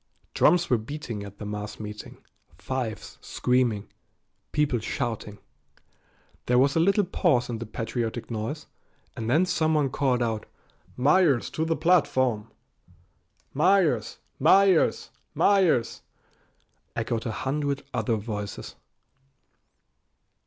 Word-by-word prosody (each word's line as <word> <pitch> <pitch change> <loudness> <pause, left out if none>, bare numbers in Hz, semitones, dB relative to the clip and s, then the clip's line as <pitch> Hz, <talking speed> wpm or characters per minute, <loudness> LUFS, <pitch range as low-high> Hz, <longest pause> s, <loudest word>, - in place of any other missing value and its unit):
Drums 175 -1 +4
were 125 -3 +2
beating 115 -3 -6
at 100 0 -10
the 105 - -7
mass 105 0 -6
meeting, 105 0 -9 0.3
fifes 110 +2 -5
screaming, 125 -5 0 0.6
people 150 -5 +1
shouting. 110 -3 -4 1.1
There 125 - +3
was 135 +2 +3
a - - +3
little 195 +5 +3
pause 160 -9 +1
in 115 - -4
the 115 - -6
patriotic 115 +1 -4
noise, 115 +8 -4 0.5
and 115 0 -4
then 160 +8 +4
someone 155 -5 +1
called 130 -3 +1
out, 110 -2 -3 0.5
"Myers 145 0 +3
to 160 - -1
the 165 0 0
platform!" 135 -9 +2 1.0
"Myers! 155 - +2 0.2
Myers! 190 +4 +4 0.2
Myers!" 185 - +2 0.9
echoed 115 0 -2
a - - -2
hundred 140 +4 -2
other 115 -1 0
voices. 105 -2 -5
125 Hz, 110 wpm, -26 LUFS, 110-155 Hz, 1.1 s, Drums